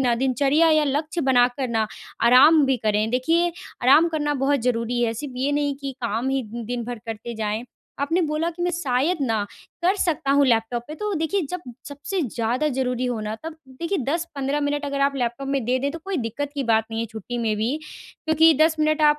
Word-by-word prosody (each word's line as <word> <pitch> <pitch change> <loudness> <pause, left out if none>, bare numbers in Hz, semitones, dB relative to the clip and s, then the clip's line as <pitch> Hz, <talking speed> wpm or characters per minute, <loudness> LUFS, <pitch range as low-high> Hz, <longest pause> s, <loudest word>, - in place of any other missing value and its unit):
ना 245 -2 +3
दिनचर्या 280 +5 +3
या 310 -1 +4
लक्ष्य 300 +4 -1
बनाकर 245 +1 +2
ना, 220 -1 +2 0.4
आराम 285 +6 +7
भी 265 -1 +2
करें। 215 -1 0
देखिए, 330 +8 +2 0.3
आराम 300 +7 +6
करना 295 -2 -1
बहुत 280 -2 +2
ज़रूरी 240 0 0
है। 225 -1 +1
सिर्फ 265 +3 -6
ये 270 +3 0
नहीं 285 -1 0
कि 275 -1 -5
काम 235 +2 -1
ही 270 -1 0
दिन 235 0 -4
भर 240 -1 -5
करते 225 +1 -6
जाएँ। 215 +1 -2 0.4
आपने 325 +6 +1
बोला 310 +3 0
कि 345 +1 -6
मैं 355 - +1
शायद 300 +2 0
ना, 220 -5 0 0.4
कर 380 +3 +3
सकता 310 -7 0
हूँ 285 0 +5
लैपटॉप 235 0 +1
पे, 305 - -6
तो 420 +3 -3
देखिए, 325 +5 0
जब 360 -1 -3 0.3
सबसे 295 +6 -4
ज़्यादा 245 +4 -1
ज़रूरी 255 -2 -1
हो 245 -3 -2
ना, 215 0 -3
तब 325 0 -6
देखिए, 335 +9 -3
10-15 295 -2 -2
मिनट 290 0 -1
अगर 280 0 -2
आप 275 0 +2
लैपटॉप 250 +2 -2
में 275 -3 0
दे 250 +3 +1
दें, 280 +2 -1
तो 330 - -6
कोई 390 -1 -2
दिक्कत 240 +5 -3
की 280 - -1
बात 220 0 +4
नहीं 225 0 -3
है 230 - -2
छुट्टी 220 +3 -6
में 225 -2 0
भी, 230 +7 0 0.5
क्योंकि 320 +1 +6
10 320 0 +4
मिनट 310 0 +2
आप 295 0 +5
275 Hz, 215 wpm, -23 LUFS, 240-305 Hz, 0.5 s, आराम